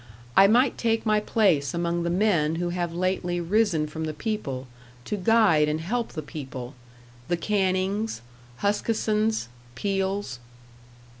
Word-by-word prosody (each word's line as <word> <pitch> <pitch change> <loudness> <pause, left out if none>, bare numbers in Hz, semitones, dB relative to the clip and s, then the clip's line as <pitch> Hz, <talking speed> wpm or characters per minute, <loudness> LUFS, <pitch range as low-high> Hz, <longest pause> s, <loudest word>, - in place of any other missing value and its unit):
I 195 - +8
might 245 +5 +3
take 225 -1 +1
my 215 -1 +3
place 180 - +2
among 170 0 -1
the 170 - -1
men 175 -5 +2
who 175 +1 -1
have 175 -1 -2
lately 175 0 -1
risen 175 -3 +1
from 160 +1 -5
the 155 -1 -4
people, 150 - -3 0.4
to - - -2
guide 195 -7 +4
and 155 +1 -1
help 230 +8 -2
the 155 - -5
people 135 -4 -7 0.5
the 175 - 0
Cannings, 195 - 0 0.4
Huskissons, 215 - 0 0.3
Peels." 195 -5 -2
185 Hz, 135 wpm, -26 LUFS, 160-210 Hz, 0.5 s, I